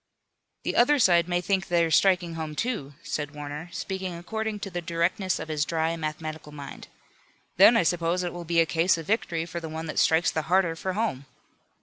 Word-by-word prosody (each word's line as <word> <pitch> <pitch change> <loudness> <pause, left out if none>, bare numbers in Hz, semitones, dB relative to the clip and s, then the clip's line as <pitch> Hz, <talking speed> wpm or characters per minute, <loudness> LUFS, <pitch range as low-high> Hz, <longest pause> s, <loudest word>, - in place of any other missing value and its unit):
"The - - -2
other 290 +5 +5
side 175 - +4
may 175 0 +1
think 190 +1 0
they're 170 -2 +2
striking 180 -1 +3
home; 160 -2 -5
too," 150 - -3
said 145 0 -4
Warner, 150 +3 -6
speaking 190 -2 -4
according 220 +4 -4
to 195 - -5
the 175 0 -3
directness 170 +3 0
of - - -6
his 155 -2 0
dry 160 +1 -1
mathematical 155 -1 -5
mind. 140 -2 -9 0.7
"Then 225 +5 +8
I - - +4
suppose 175 +1 0
it 175 - -3
will 175 0 -6
be 170 0 +1
a 165 - +5
case 165 +3 +2
of 165 - -6
victory 170 -5 -1
for 170 0 -5
the 165 -1 -7
one 160 +1 -5
that 155 - -2
strikes 160 0 +3
the 160 - -1
harder 180 -3 +3
for 185 +3 -3
home." 180 - -2
170 Hz, 205 wpm, -26 LUFS, 160-185 Hz, 0.7 s, Then